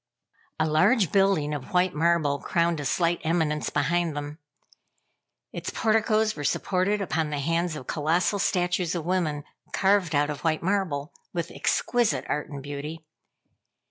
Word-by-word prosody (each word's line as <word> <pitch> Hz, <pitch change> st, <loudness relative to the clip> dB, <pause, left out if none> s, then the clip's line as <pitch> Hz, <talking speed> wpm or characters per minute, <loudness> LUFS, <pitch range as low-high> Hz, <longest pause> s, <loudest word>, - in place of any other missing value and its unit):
A 155 Hz, -, +3 dB
large 170 Hz, -, +3 dB
building 195 Hz, -7 st, +2 dB
of 145 Hz, +1 st, -6 dB
white 180 Hz, 0 st, +3 dB
marble 155 Hz, -3 st, +2 dB
crowned 170 Hz, +1 st, 0 dB
a 145 Hz, -, -4 dB
slight 170 Hz, +4 st, +1 dB
eminence 160 Hz, -2 st, 0 dB
behind 165 Hz, +1 st, 0 dB
them. 145 Hz, +2 st, -6 dB, 1.1 s
Its -, -, -4 dB
porticos 220 Hz, -1 st, +2 dB
were 145 Hz, -, -6 dB
supported 190 Hz, +7 st, 0 dB
upon 165 Hz, -5 st, -1 dB
the 150 Hz, -, -3 dB
hands 165 Hz, +3 st, 0 dB
of 130 Hz, -, -7 dB
colossal 170 Hz, +8 st, 0 dB
statues 180 Hz, -2 st, 0 dB
of 165 Hz, -3 st, -3 dB
women, 165 Hz, -5 st, 0 dB, 0.3 s
carved 190 Hz, -5 st, +2 dB
out 145 Hz, +1 st, +2 dB
of 145 Hz, -1 st, -6 dB
white 160 Hz, -1 st, 0 dB
marble 175 Hz, -6 st, -1 dB, 0.2 s
with 170 Hz, 0 st, -3 dB
exquisite 240 Hz, -3 st, 0 dB
art 150 Hz, -, -2 dB
and 140 Hz, -3 st, -7 dB
beauty. 145 Hz, +3 st, -6 dB
165 Hz, 145 wpm, -26 LUFS, 150-185 Hz, 1.1 s, A